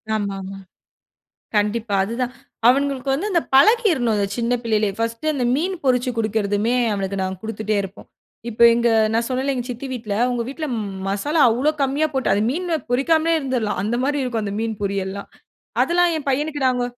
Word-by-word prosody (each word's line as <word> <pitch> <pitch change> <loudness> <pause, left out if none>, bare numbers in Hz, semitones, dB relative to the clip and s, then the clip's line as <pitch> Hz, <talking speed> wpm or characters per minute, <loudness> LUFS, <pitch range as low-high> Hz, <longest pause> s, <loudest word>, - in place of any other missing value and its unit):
ஆமாமா, 195 -2 -4 1.0
கண்டிப்பா. 210 +1 0
அது 210 +4 -4
தான் 250 0 -2 0.3
அவனுங்களுக்கு 275 +1 +2
வந்து 355 +10 -1
அந்த 340 -3 +3
பழக்கிறனும் 320 - +4
அந்த 200 -1 0
சின்ன 235 +1 0
பிள்ளையிலேயே. 215 -3 +1
ஃபர்ஸ்டு 230 +7 -1
அந்த 260 -4 -1
மீன் 360 +6 -1
பொரிச்சு 250 -1 +2
குடுக்கறதுமே 215 +1 0 0.2
அவனுக்கு 195 -1 -3
நாங்க 190 0 -3
குடுத்துட்டே 215 -1 -2
இருப்போம். 195 0 -10 0.4
இப்ப 230 0 -6
எங்க 235 0 +2 0.3
நான் 230 +1 +1
சொன்னேல 265 +2 -1
எங்க 245 -2 -3
சித்தி 245 +2 -5
வீட்டுல 225 -5 -4
அவங்க 245 -1 -1
வீட்டுல 305 +4 -4 0.4
மசாலா 285 +11 0
அவ்ளோ 250 +6 +1
கம்மியா 280 +3 +1
போட்டு 265 -5 0
அது 200 - +1
மீன் 355 +6 -3 0.3
பொரிக்காமலே 315 +6 +2
இருந்துரலாம். 250 -8 -2
அந்த 220 +3 -1
மாரி 285 +1 0
இருக்கும் 235 -4 -2
அந்த 200 -1 -3
மீன் 225 -1 -2
பொரியல்லாம். 200 0 -3 0.5
அதெல்லாம் 350 0 +2
என் 290 - -8
பையனுக்கு 290 +2 -1
நாங்க 250 -1 +1
245 Hz, 165 wpm, -21 LUFS, 210-275 Hz, 1.0 s, பழக்கிறனும்